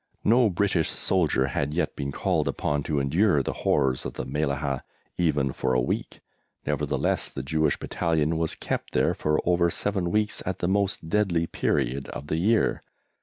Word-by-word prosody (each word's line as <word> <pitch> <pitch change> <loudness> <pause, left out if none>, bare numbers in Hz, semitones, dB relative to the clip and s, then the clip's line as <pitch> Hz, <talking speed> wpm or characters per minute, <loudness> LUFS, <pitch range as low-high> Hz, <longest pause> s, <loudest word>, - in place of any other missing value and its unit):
No 120 +1 +5
British 90 -3 +1
soldier 80 -8 +1
had 70 +3 -2
yet 90 - -1
been 70 0 -3
called - - 0
upon 75 0 -1
to 75 0 -1
endure 75 +2 +2
the - - -2
horrors 65 -3 +2
of - - -5
the - - -5
Mellahah 70 -1 -1 0.4
even 75 -6 +1
for 65 -1 0
a - - +4
week; 60 - -3 0.4
nevertheless - - 0
the - - -6
Jewish 80 +1 +1
Battalion 80 -1 0
was 80 -1 -1
kept - - -4
there - - +2
for 75 0 0
over 85 -1 +3
seven 95 0 -1
weeks 105 +3 0
at 95 0 -3
the 90 - -1
most 100 -3 0
deadly 85 -3 +1
period 70 -4 -1
of 70 - -7
the 80 - 0
year. 110 +6 +2
80 Hz, 170 wpm, -26 LUFS, 70-90 Hz, 0.4 s, No